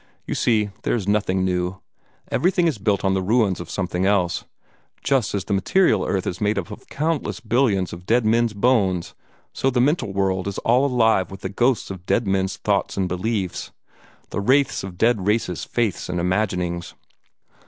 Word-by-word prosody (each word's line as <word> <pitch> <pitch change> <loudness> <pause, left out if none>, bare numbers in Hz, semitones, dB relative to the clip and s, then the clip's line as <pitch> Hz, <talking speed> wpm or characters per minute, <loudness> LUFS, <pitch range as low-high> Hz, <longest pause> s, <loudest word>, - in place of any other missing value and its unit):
You - - -3
see, 105 -3 +1
there - - 0
is 105 -5 -3
nothing 95 -3 +1
new. 90 0 -1 0.5
Everything 180 0 +2
is 145 -10 -1
built 100 0 0
on 95 - +3
the 95 - 0
ruins 105 -1 +2
of 85 - -7
something 90 -2 -2
else. 95 -3 +1 0.6
Just 135 -6 +1
as 95 -2 -2
the - - -2
material 105 - +3
earth 95 -2 -1
is 90 - -4
made 105 0 +1
up 90 -4 -3
of - - -11
countless 155 +1 -2
billions 110 -6 +1
of 85 +1 -10
dead 120 0 +3
men's 115 0 +2
bones, 100 -6 +1 0.4
so 135 - +1
the 125 -1 0
mental 130 - +1
world 95 -1 0
is 100 - -4
all 125 +4 +4
alive 110 -8 +2
with 95 0 -10
the 95 - -3
ghosts 120 +2 +1
of 90 -2 -9
dead 115 - +2
men's 95 -1 0
thoughts - - -1
and 95 -1 +1
beliefs, 95 +1 -2 0.6
the - - -2
wraiths 135 +4 +2
of 95 -2 -8
dead 110 -3 +2
races' 105 -5 0
faiths 115 -8 -1
and 90 -1 -1
imaginings." 90 -2 -1
100 Hz, 185 wpm, -22 LUFS, 95-120 Hz, 0.6 s, all